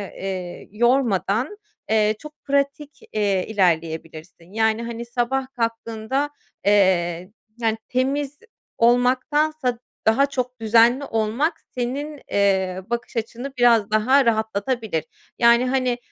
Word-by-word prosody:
eee, 185 -2 -5
yormadan, 240 - +1 0.3
eee, 215 -1 +3
çok 300 0 -10
pratik, 280 +1 -1
eee, 200 -3 +1
ilerleyebilirsin. 165 -2 -2
Yani, 220 +1 +1
hani, 235 0 -5
sabah 250 +2 -1
kalktığında, 230 +4 -2 0.4
eee, 185 -3 +2 0.3
yani, 225 -2 0
temiz 275 +3 -1 0.4
olmaktansa 255 +2 +2 0.3
daha 225 +6 +5
çok 255 -3 -4
düzenli 230 +4 +4
olmak 235 +10 -1
senin, 275 +4 -3
eee, 190 -2 +1
bakış 235 0 -4
açını 240 +4 -4
biraz 230 -4 +4
daha 255 +6 +4
rahatlatabilir. 220 -4 -1 0.4
Yani, 235 +1 +5
hani, 255 -2 +1
235 Hz, 105 wpm, -22 LUFS, 205-260 Hz, 0.4 s, daha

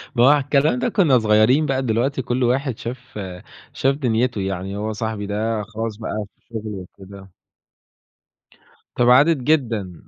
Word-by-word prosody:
ما 120 - +4
هو - - +7
على 145 -1 +4
الكلام 140 -1 +2
ده 130 - 0
كنّا 145 - +3
صغيرين 110 +7 +3
بقى 135 -2 0
دلوقتي 125 +4 0
كل 125 +1 -1
واحد 130 0 0
شاف 125 -2 -8 0.5
شاف 135 +1 +1
دنيته، 120 -5 0
يعني 95 +1 -4
هو 110 +1 -3
صاحبي 110 0 -4
ده 105 +1 -2
خلاص 110 0 -5
بقى 110 -1 -4
في - - -43
شغله، 110 -2 -5
وكده. 95 +1 -13 1.6
تباعدت 130 +7 +5
جدًا 120 - 0
115 Hz, 150 wpm, -21 LUFS, 105-130 Hz, 1.6 s, هو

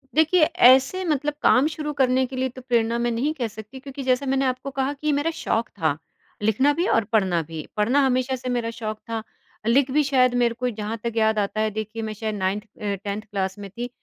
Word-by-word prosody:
देखिए, 320 +2 +4
ऐसे 270 +3 +5
मतलब 295 -2 0
काम 260 +3 +5
शुरू 300 -1 -4
करने 260 -2 +2
के 260 +1 -8
लिए 260 0 0
तो 255 +1 -11
प्रेरणा 235 -2 +1
मैं 240 0 +1
नहीं 260 +7 0
कह 250 -6 -2
सकती 220 +4 -10
क्योंकि 275 +1 -7
जैसा 255 +1 +1
मैंने 270 0 +1
आपको 255 +1 -2
कहा 270 +1 -1
कि 290 +1 -6
ये 300 - +3
मेरा 290 +3 0
शौक 225 +1 -1
था, 155 -6 -1 0.4
लिखना 220 +7 +3
भी 345 +5 0
और 225 - +3
पढ़ना 185 -5 +3
भी। 160 0 -7
पढ़ना 230 +7 +3
हमेशा 255 0 +1
से 255 0 -5
मेरा 240 -2 -1
शौक 215 -2 -5
था, 225 -1 -3 0.4
लिख 260 +3 +3
भी 300 +2 +3
शायद 255 -3 +3
मेरे 240 -1 +2
को 250 0 0
जहाँ 215 0 -4
तक 235 - -2
याद 220 -1 +3
आता 210 +1 -1
है, 220 - +1
देखिए, 220 +1 -5
मैं 215 0 -3
शायद 215 0 -4
नाइन्थ 195 +1 -1
अ, 205 -1 -5
10th 205 0 -3
क्लास 195 -3 -3
में 200 -1 -7
थी, 240 +5 -6
245 Hz, 230 wpm, -24 LUFS, 215-270 Hz, 0.4 s, ऐसे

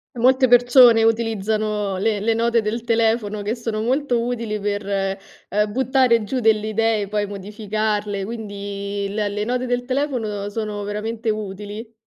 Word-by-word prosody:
Molte 260 +2 +4
persone 245 -1 +6
utilizzano 215 -2 0
le 210 +2 0
le 225 +3 +1
note 230 0 +2
del 220 +2 -2
telefono 225 -2 +1
che 210 +3 -1
sono 230 -3 -3
molto 250 +1 +1
utili 230 -3 -2
per, 205 0 -2
ehm, 195 +1 -2
buttare 255 -1 +2
giù 255 +5 -2
delle 215 -2 +3
idee 220 -1 +1
poi 205 +1 -1
modificarle, 210 0 -3
quindi 200 -2 -5
le 205 +1 -1
le 205 +1 -3
note 250 +2 -1
del 245 0 -1
telefono 245 -7 -2
sono 210 -1 -4
veramente 220 +2 -3
utili. 210 +2 -6
215 Hz, 145 wpm, -21 LUFS, 205-235 Hz, -, persone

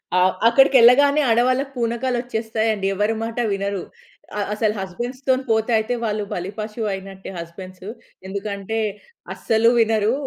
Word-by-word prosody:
ఆ! - - +4 0.3
అక్కడికెళ్ళగానే 270 +3 +6
ఆడవాళ్లకి 255 +4 +2
పూనకాలొచ్చేస్తాయండి 230 -3 -1
ఎవ్వరి 210 +3 0
మాట 230 +1 -5 0.2
వినరు. 200 -1 -2 0.6
ఆహ్, 205 - -1
అసలు 210 0 0
హస్బెండ్స్‌తోని 255 +7 -2
పోతే 220 +2 +1
అయితే 220 +3 -1
వాళ్ళు 210 -1 -1
బలిపశువయినట్టే 195 0 -5
హస్బెండ్సు. 185 +3 -9 0.4
ఎందుకంటే 200 +2 -4 0.5
అస్సలు 225 +1 +2
వినరు. 220 0 +2
220 Hz, 105 wpm, -21 LUFS, 200-240 Hz, 0.6 s, అక్కడికెళ్ళగానే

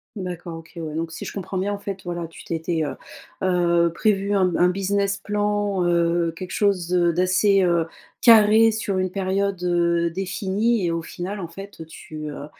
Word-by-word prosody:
D'accord, 180 -3 -6
OK, 160 - -16
ouais, 155 -2 -5
donc, 165 0 -3
si 165 - -7
je - - -6
comprends 195 -1 -5
bien 200 +2 -1
en - - -3
fait, 200 -1 -6
voilà, 175 -1 -3
tu 165 - -14
t'étais, 165 0 -2
heu, - - -4 0.5
heu, 170 -2 +3
prévu 200 +1 +1
un 195 -2 +3
b 180 - 0
un 180 - +4
business 195 +1 0
plan, 205 -2 -1
heu, 170 -1 +2
quelque 185 +1 -7
chose, 185 -4 +1
heu, 175 -1 +3
d'assez, 185 +3 +3
heu, 170 -2 +2 0.4
carré 225 -1 +7
sur 210 -3 -2
une 185 -1 0
période, 195 0 -1
heu, 170 -1 +2
définie, 195 +3 0
et 170 - 0
au 165 - -2
final 185 +4 -6
en 170 - -6
fait, 195 0 -10
heu, - - -7
tu, 155 -1 -8
heu, 145 - -7
185 Hz, 195 wpm, -23 LUFS, 170-200 Hz, 0.5 s, carré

